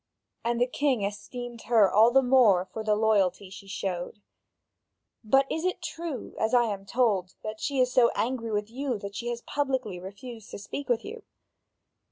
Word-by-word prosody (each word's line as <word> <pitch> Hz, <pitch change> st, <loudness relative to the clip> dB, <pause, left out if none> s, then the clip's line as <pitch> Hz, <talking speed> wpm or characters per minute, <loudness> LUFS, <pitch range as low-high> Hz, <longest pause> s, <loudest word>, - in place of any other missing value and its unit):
And 235 Hz, 0 st, 0 dB
the 245 Hz, -, +4 dB
king 260 Hz, -3 st, 0 dB
esteemed 235 Hz, +4 st, -5 dB
her 225 Hz, -4 st, +6 dB
all 220 Hz, +3 st, +7 dB
the 265 Hz, +2 st, +4 dB
more 240 Hz, -8 st, +5 dB
for 220 Hz, +4 st, -7 dB
the 215 Hz, -1 st, +2 dB
loyalty 200 Hz, -3 st, +1 dB
she 195 Hz, 0 st, -11 dB
showed. 190 Hz, -1 st, -4 dB, 1.0 s
But 270 Hz, +5 st, +4 dB
is 320 Hz, -, -2 dB
it 370 Hz, 0 st, 0 dB
true, 335 Hz, -6 st, -6 dB
as 220 Hz, +3 st, +2 dB
I 240 Hz, -, +6 dB
am 200 Hz, -3 st, -4 dB
told, 200 Hz, -6 st, +1 dB
that 215 Hz, 0 st, -5 dB
she 280 Hz, -2 st, -1 dB
is 250 Hz, 0 st, +2 dB
so 240 Hz, -2 st, +6 dB
angry 230 Hz, -1 st, -1 dB
with 210 Hz, +1 st, -2 dB
you 260 Hz, -1 st, -2 dB
that 200 Hz, 0 st, -7 dB
she 235 Hz, +4 st, -5 dB
has 240 Hz, -1 st, -3 dB
publicly 260 Hz, -9 st, -2 dB
refused 215 Hz, +4 st, -9 dB
to -, -, -7 dB
speak 255 Hz, +7 st, -7 dB
with 240 Hz, -2 st, +1 dB
you?" 455 Hz, +3 st, -7 dB
230 Hz, 185 wpm, -27 LUFS, 205-255 Hz, 1.0 s, all